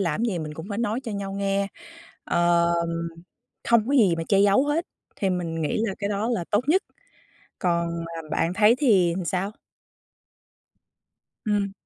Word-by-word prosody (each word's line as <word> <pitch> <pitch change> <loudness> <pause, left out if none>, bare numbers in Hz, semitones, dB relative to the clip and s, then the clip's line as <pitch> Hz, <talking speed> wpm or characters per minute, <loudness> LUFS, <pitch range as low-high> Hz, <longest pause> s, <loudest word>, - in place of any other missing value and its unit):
làm 180 +2 0
gì 195 -7 -1
mình 155 -1 -5
cũng 160 +3 -8
phải 205 +1 -3
nói 230 +1 -1
cho 235 -5 -6
nhau 200 -1 -4
nghe, 200 0 0 0.6
ờ, 170 0 +2 1.0
không 235 -1 +4
có 280 - 0
gì 195 -9 +5
mà 165 - -3
che 195 -1 +4
giấu 205 +7 +4
hết. 315 +4 0 0.3
Thì 195 - 0
mình 170 -3 -2
nghĩ 155 - 0
là 195 - -2
cái 200 0 -2
đó 210 +3 -1
là 195 -8 0
tốt 205 - +3
nhất, 375 +6 +4 0.8
còn, 170 -2 -1 0.2
ờm, 155 - -15
bạn 165 +3 0
thấy 215 +3 +5
thì 190 - +4
làm 180 0 -3
sao? 190 +4 -1 1.9
Ừm. 205 -2 0
195 Hz, 170 wpm, -25 LUFS, 170-215 Hz, 1.9 s, gì